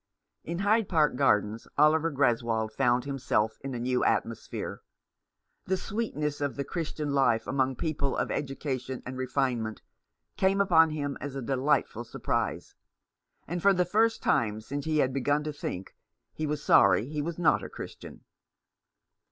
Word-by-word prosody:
In 170 +1 -4
Hyde 205 +2 +2
Park 155 -6 +3
Gardens 105 -1 +1
Oliver 155 +2 +4
Greswold 115 -5 +1
found 120 +2 +1
himself 130 -6 -1
in 135 -2 -4
a - - -3
new 125 +1 0
atmosphere. 115 -1 -2 0.8
The 190 - 0
sweetness 150 -10 -3
of 145 -1 -1
the 140 - -2
Christian 150 -1 -3
life 120 -5 +2
among 135 -1 0
people 140 -2 -2
of - - -1
education 135 -2 -3
and 130 - -6
refinement 125 -4 -1 0.5
came 195 +1 +2
upon 165 -5 +5
him 145 -2 -3
as 145 -1 -5
a 135 - -3
delightful 130 -2 0
sur 115 - -10
prise; - - -2 0.7
and 175 +2 -3
for 200 +2 +5
the 180 -1 +2
first 220 +5 +2
time 110 -2 +1
since 140 +7 -5
he 155 -1 0
had 130 -3 +2
begun 145 +2 +1
to 150 0 -4
think 95 -9 -6 0.4
he 155 - -3
was 150 0 -3
sorry 110 - +5
he 150 +1 -3
was 165 +2 -4
not 175 - +3
a - - -6
Christian. - - -10
140 Hz, 160 wpm, -28 LUFS, 125-160 Hz, 0.8 s, upon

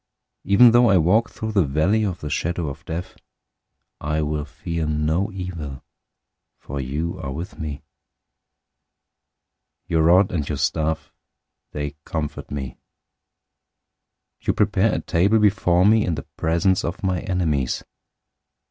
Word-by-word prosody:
023:004 - - -4
Even 120 +4 +8
though 120 0 +5
I 100 - +5
walk 105 +8 +3
through 110 -1 -5
the 100 -4 +3
valley 80 +10 +1
of 90 -5 -3
the 75 - -4
shadow 85 -1 -1
of 70 +2 -9
death, 85 +3 -5 0.8
I 75 +1 -1
will 75 0 -2
fear 80 +2 -4
no 80 +7 0
evil, 85 -8 -6 0.7
for 70 0 -6
you 75 +6 -3
are 65 - -5
with 85 +9 -7
me. 75 -1 -5 2.0
Your 80 -1 +1
rod 90 +4 +5
and 75 -5 -2
your 75 - -2
staff, 80 +3 -1 0.6
they 75 0 -5
comfort 75 -3 -4
me. 65 -4 -5 1.6
023:005 - - -20
You - - +3
prepare 105 +1 +2
a - - -2
table 100 +6 +2
before 95 -4 +3
me 110 +1 +5
in 85 - -1
the - - -7
presence 85 +3 +1
of 85 +4 -4
my 90 -2 +1
enemies. 80 -10 -1
85 Hz, 140 wpm, -22 LUFS, 75-95 Hz, 2.0 s, Even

